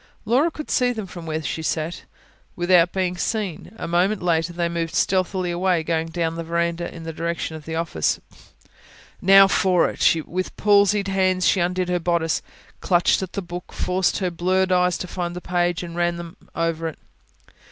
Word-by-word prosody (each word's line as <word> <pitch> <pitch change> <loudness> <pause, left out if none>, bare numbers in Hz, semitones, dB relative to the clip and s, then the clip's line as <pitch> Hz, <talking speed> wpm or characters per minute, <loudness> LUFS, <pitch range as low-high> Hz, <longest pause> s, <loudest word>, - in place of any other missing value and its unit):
Laura 255 +9 +3
could 305 -2 -7
see 250 -1 +3
them 220 -4 -4
from 175 -3 -9
where 160 0 -2
she 160 - -3
sat, 160 +1 -3 0.5
without 175 -1 +4
being 185 -2 -1
seen. 195 -2 -3
A - - -5
moment 180 +4 +1
later 165 -1 +1
they 170 0 -1
moved 170 -1 -3
stealthily 185 -1 +1
away, 175 -1 +1
going 160 0 -1
down 165 0 -2
the 165 0 -5
verandah 170 +1 -1
in 165 - -9
the 165 0 -5
direction 165 0 -3
of 155 -2 -10
the 160 - -4
office. 160 - 0 1.0
Now 195 +1 +8
for 185 -2 +3
it! - - +3
With 185 +1 -4
palsied 205 -1 +3
hands 185 -1 +2
she 190 - +3
undid 180 +1 0
her 180 0 +1
bodice, 170 -1 0 0.4
clutched 175 0 +2
at 190 - -5
the 200 - -3
book, 175 +1 -8
forced 185 0 0
her 185 -2 -1
blurred 185 +2 +1
eyes 180 -1 +3
to 180 - -5
find 175 -1 -4
the - - -4
page, 175 -1 0
and 170 -1 -7
ran 175 0 0
them 170 +1 -8 0.2
over 165 -1 -1
it. 160 - -6
175 Hz, 185 wpm, -23 LUFS, 165-185 Hz, 1.0 s, Now